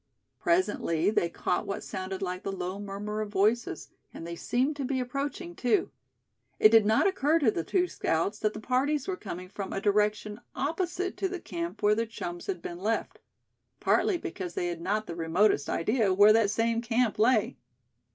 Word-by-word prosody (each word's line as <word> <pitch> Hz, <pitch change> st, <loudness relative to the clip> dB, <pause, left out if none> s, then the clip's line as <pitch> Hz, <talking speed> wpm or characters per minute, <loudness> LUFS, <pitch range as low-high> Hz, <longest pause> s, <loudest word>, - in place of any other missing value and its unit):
Presently 240 Hz, -, +1 dB
they 170 Hz, -5 st, +1 dB
caught 180 Hz, -, -2 dB
what 200 Hz, -, -4 dB
sounded 190 Hz, +1 st, -5 dB
like 180 Hz, 0 st, -3 dB
the 195 Hz, -, -3 dB
low 190 Hz, 0 st, -4 dB
murmur 205 Hz, +1 st, -4 dB
of 215 Hz, -, -4 dB
voices, 215 Hz, -1 st, 0 dB, 0.2 s
and 165 Hz, -, -8 dB
they 170 Hz, 0 st, -5 dB
seemed 255 Hz, -, 0 dB
to 280 Hz, -, -2 dB
be 260 Hz, 0 st, -1 dB
approaching 280 Hz, +7 st, -4 dB
too. 255 Hz, +10 st, +1 dB, 0.7 s
It 215 Hz, -, +7 dB
did 220 Hz, -2 st, +5 dB
not 220 Hz, +1 st, +4 dB
occur 330 Hz, -5 st, +3 dB
to 275 Hz, -9 st, +3 dB
the 165 Hz, -, -2 dB
two 360 Hz, -, +1 dB
scouts 170 Hz, -, -1 dB
that 215 Hz, 0 st, 0 dB
the -, -, -6 dB
parties 265 Hz, +5 st, 0 dB
were 380 Hz, -, -1 dB
coming 185 Hz, -, -7 dB
from 195 Hz, +1 st, -6 dB
a -, -, -2 dB
direction 210 Hz, +1 st, 0 dB
opposite 350 Hz, +5 st, -2 dB
to 385 Hz, -, -1 dB
the 370 Hz, -1 st, -4 dB
camp 175 Hz, -, -5 dB
where 210 Hz, 0 st, +5 dB
their 225 Hz, +2 st, 0 dB
chums 175 Hz, -5 st, -6 dB
had 390 Hz, -, -3 dB
been 175 Hz, 0 st, -6 dB
left; 220 Hz, +4 st, -2 dB, 0.6 s
partly 390 Hz, -, +2 dB
because 200 Hz, -, -6 dB
they 175 Hz, -, -1 dB
had 170 Hz, -1 st, -5 dB
not 210 Hz, +5 st, -1 dB
the 170 Hz, -, -6 dB
remotest 165 Hz, -1 st, +2 dB
idea 215 Hz, +3 st, +1 dB
where 205 Hz, +3 st, +7 dB
that 220 Hz, -2 st, +3 dB
same 230 Hz, +2 st, +1 dB
camp 235 Hz, -2 st, 0 dB
lay. 240 Hz, +4 st, +3 dB
215 Hz, 190 wpm, -28 LUFS, 190-260 Hz, 0.7 s, It